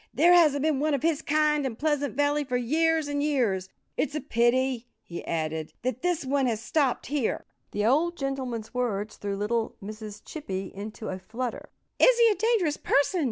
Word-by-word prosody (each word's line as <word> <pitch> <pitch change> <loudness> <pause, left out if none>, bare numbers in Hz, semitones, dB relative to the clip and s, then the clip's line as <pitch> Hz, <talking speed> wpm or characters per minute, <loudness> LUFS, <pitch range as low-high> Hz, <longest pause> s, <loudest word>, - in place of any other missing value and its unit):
"There 340 +5 +5
hasn't 300 -5 +5
been 305 -3 +2
one 300 0 +2
of 270 - -4
his 320 -2 +1
kind 300 -1 +2
in 260 -4 -2
Pleasant 290 -2 -1
Valley 290 +1 +2
for 250 -3 -1
years 315 +5 +1
and 285 0 -1
years.... 230 -11 0 0.3
It's 300 - -1
a - - 0
pity," 250 -1 +1 0.2
he 170 - -7
added, 160 -1 -2
"that 255 0 -2
this 350 -5 0
one 270 0 +1
has 225 -3 0
stopped 265 +3 0
here." 280 -4 -1 0.2
The 205 0 -1
old 325 +8 +2
gentleman's 260 -5 -4
words 215 -4 -2
threw 200 -1 -3
little 220 +2 -1
Mrs. 215 +1 -8
Chippy 195 - -5
into 215 +2 -7
a 190 - -4
flutter. 235 +5 -5 0.3
"Is - - +6
he 470 -1 +6
a - - +1
dangerous 415 -10 +1
person?" 285 +6 +2
265 Hz, 185 wpm, -27 LUFS, 220-300 Hz, 0.3 s, Is